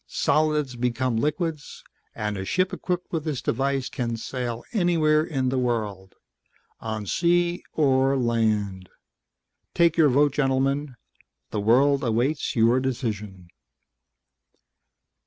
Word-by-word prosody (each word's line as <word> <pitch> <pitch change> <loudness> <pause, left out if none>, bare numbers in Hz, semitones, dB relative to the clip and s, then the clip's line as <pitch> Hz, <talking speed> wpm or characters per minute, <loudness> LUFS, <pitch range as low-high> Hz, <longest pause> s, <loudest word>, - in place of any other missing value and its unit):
Solids 150 -4 +1
become 125 0 -1
liquids, 150 +3 -3 0.3
and 105 -1 -3
a 95 - -4
ship 185 - 0
equipped 180 -1 -3
with 165 -3 -2
this 150 -5 -2
device 135 +2 -1
can 120 -2 -3
sail 120 0 -4
anywhere 165 -6 +3
in 135 -5 -1
the 130 0 0
world 105 -6 -3 0.6
on 110 -2 -4
sea 175 - +1
or 135 -2 +2
land. 110 -6 0 0.9
Take 170 -1 +3
your 155 -3 +5
vote, 145 +2 +3
gentlemen; 135 0 0 0.6
the 105 - -2
world 135 +6 +3
awaits 125 +6 0
your 115 +2 +4
decision." 105 -8 -4
130 Hz, 115 wpm, -25 LUFS, 115-150 Hz, 0.9 s, your